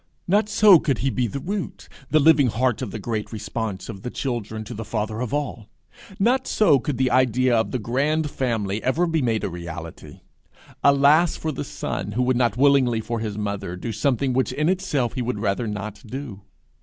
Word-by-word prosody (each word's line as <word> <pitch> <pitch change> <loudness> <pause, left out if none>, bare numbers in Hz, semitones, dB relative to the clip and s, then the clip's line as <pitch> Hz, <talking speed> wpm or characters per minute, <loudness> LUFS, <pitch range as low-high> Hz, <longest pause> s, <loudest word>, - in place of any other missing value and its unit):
Not 210 +4 +2
so 210 -4 +7
could 140 -5 0
he 135 - +2
be 125 -1 0
the 140 - -5
root, 195 +6 -5 0.2
the 155 - +4
living 150 -2 +5
heart 125 +1 0
of - - -3
the 105 - -6
great 110 0 -4
response 110 -2 -4
of 100 -4 -8
the 125 - -5
children 115 -5 -4
to 120 - -8
the 115 0 -5
Father 110 0 -3
of 125 - -3
all! 135 -7 -3 0.5
not 250 +6 +2
so 175 -11 +4
could 145 0 -3
the 130 -1 +1
idea 130 -1 +3
of 110 0 +1
the 130 - -2
grand 145 +7 0
family 110 -5 -2
ever 155 +7 +1
be 165 -2 0
made 115 -4 0
a - - 0
reality! 85 -1 -8 0.6
Alas 140 +4 +5
for 160 - -3
the 135 - -4
son 105 - -4
who 125 +4 +1
would 130 0 +2
not 120 -3 +1
willingly 135 -4 +4
for 115 +1 -3
his 105 -2 -4
mother 100 -3 -3
do 100 +6 -5
something 130 +3 0
which 130 +1 +1
in 150 +3 0
itself 165 - 0
he 125 - -3
would 125 -1 -2
rather 105 +2 -1
not 105 0 -5
do! 125 -4 -7
125 Hz, 205 wpm, -23 LUFS, 110-140 Hz, 0.6 s, so